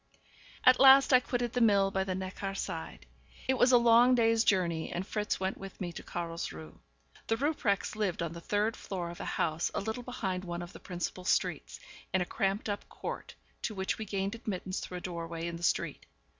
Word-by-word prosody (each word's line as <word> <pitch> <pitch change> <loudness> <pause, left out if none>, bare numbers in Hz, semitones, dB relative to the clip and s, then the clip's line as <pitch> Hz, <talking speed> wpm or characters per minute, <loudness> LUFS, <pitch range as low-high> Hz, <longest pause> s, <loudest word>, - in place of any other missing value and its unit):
At 255 0 +7
last 270 0 +8
I 255 - +9
quitted 245 -1 -2
the 245 - 0
mill 200 -3 +4
by 190 0 0
the 190 -1 -2
Neckar 190 +1 -4
side. - - -5 0.4
It 265 - +4
was 250 - +6
a 245 - +8
long 235 +2 +6
day's 225 -1 +3
journey, 175 -6 +1
and 180 +2 -3
Fritz 210 0 -2
went 190 0 -2
with 195 -1 -9
me 175 -2 -3
to - - -8
Carlsruhe. 165 - -6 0.5
The 225 - +1
Rupprechts 245 -9 0
lived 200 -6 -1
on 165 -1 -3
the 170 - -8
third 210 +4 0
floor 175 -3 -5
of 175 - -11
a - - -5
house 160 +1 0
a - - +1
little 220 +4 -3
behind 190 -7 -3
one 175 -1 -4
of 175 +2 -10
the - - -10
principal 180 0 -5
streets, 200 - 0 0.4
in - - +4
a 180 - 0
cramped 195 +4 -1
up 205 -1 -4
court, - - -6 0.3
to 215 - -3
which 190 +2 -2
we 220 - -3
gained 195 0 -2
admittance 195 -5 -4
through 180 - -6
a - - -7
doorway 170 -2 -5
in 170 0 -4
the - - -12
street. 175 - -1
195 Hz, 210 wpm, -31 LUFS, 175-225 Hz, 0.5 s, I